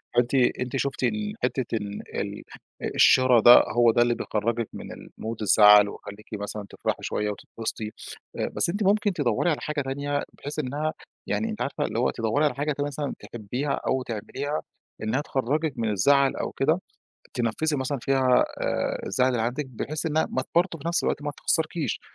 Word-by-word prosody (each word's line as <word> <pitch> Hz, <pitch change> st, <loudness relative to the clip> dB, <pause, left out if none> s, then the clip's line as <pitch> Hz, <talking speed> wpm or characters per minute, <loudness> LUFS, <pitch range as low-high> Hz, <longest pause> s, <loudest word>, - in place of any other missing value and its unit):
فأنتِ 120 Hz, +2 st, +2 dB
أنتِ 125 Hz, 0 st, +1 dB
شُفتِ 135 Hz, 0 st, -2 dB
ال 210 Hz, -1 st, -1 dB
حتة 130 Hz, -3 st, -1 dB
ال 105 Hz, -1 st, -5 dB, 0.2 s
ال -, -, -6 dB, 0.5 s
الشرا 130 Hz, -2 st, +6 dB
ده، 120 Hz, +2 st, +9 dB
هو 120 Hz, -1 st, +6 dB
ده 120 Hz, -, +2 dB
اللي 120 Hz, 0 st, +3 dB
بيخرجِّك 115 Hz, +1 st, -1 dB
من -, -, -8 dB
الmood 110 Hz, +1 st, -7 dB
الزعل 105 Hz, 0 st, +7 dB
ويخليكِ 100 Hz, +1 st, -10 dB
مثلًا 105 Hz, 0 st, -5 dB
تفرحي -, -, -2 dB
شوية 105 Hz, 0 st, -1 dB
وتتبسطي، 110 Hz, +1 st, -5 dB, 0.4 s
آآ، -, -, -1 dB
بس -, -, +1 dB
أنتِ 205 Hz, +5 st, -1 dB
ممكن 205 Hz, +1 st, +2 dB
تدوّري 145 Hz, 0 st, +1 dB
على 155 Hz, -, -1 dB
حاجة 150 Hz, -1 st, -2 dB
تانية 140 Hz, +2 st, -2 dB
بحيث 145 Hz, +2 st, -6 dB
إنها 150 Hz, +3 st, -2 dB, 0.3 s
يعني 225 Hz, -, -1 dB
أنتِ 215 Hz, -, -5 dB
عارفة 140 Hz, -, -1 dB
اللي 115 Hz, -, -2 dB
هو 125 Hz, -, +2 dB
تدوّري 115 Hz, +6 st, 0 dB
على 140 Hz, -4 st, 0 dB
حاجة 145 Hz, +2 st, -1 dB
ت 145 Hz, -, -3 dB
مثلًا 145 Hz, 0 st, -2 dB
تحبيها 125 Hz, +6 st, -4 dB, 0.2 s
أو 130 Hz, 0 st, +1 dB
تعمليها، 135 Hz, +6 st, -4 dB, 0.4 s
إنها 110 Hz, +6 st, 0 dB
تخرجِّك 145 Hz, +3 st, -1 dB
من 115 Hz, -2 st, 0 dB
الزعل 135 Hz, +7 st, +3 dB
أو -, -, -3 dB
كده، 155 Hz, +6 st, +1 dB, 0.5 s
تنفِّسي 125 Hz, +6 st, 0 dB
مثلًا 135 Hz, +1 st, -2 dB
فيها، 130 Hz, -1 st, +3 dB, 0.2 s
آآ، -, -, -1 dB
الزعل 125 Hz, +6 st, +2 dB
اللي 120 Hz, -3 st, 0 dB
عندِك 125 Hz, +5 st, -2 dB
بحيث 150 Hz, +6 st, -4 dB
إنها 160 Hz, 0 st, +1 dB
ما 130 Hz, -, -1 dB
ت -, -, -13 dB
برضه 170 Hz, 0 st, +2 dB
في 155 Hz, -, -4 dB
نفس 170 Hz, -, +1 dB
الوقت -, -, -1 dB
ما 145 Hz, -, -2 dB
تخسّركيش، 160 Hz, -1 st, -1 dB
130 Hz, 180 wpm, -26 LUFS, 115-150 Hz, 0.5 s, ده